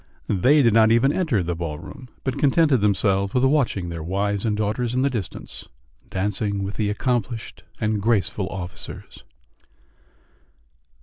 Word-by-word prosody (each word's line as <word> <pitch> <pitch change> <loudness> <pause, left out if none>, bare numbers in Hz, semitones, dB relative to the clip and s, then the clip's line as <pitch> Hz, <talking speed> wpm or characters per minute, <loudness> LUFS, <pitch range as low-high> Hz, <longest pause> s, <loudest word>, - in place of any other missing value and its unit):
They 135 +10 +4
did 115 -3 +4
not 110 0 +5
even 120 +5 +4
enter 155 - +1
the 85 +1 -2
ball 80 -3 -4
room, 125 - -11
but 130 - -2
contented 145 -3 +3
themselves 100 0 +1
with 125 +1 +4
watching 130 - +1
their 85 -1 -5
wives 100 +5 -1
and 105 -1 0
daughters 110 +3 -1
in 130 - +2
the 140 - +2
distance 110 -8 -6 0.4
dancing 100 +1 -1
with 100 +1 -4
the 105 -2 -1
accomplished 115 +1 -2 0.2
and 105 -1 0
graceful 105 -3 0
officers. 90 -2 -8
105 Hz, 145 wpm, -23 LUFS, 95-125 Hz, 0.4 s, not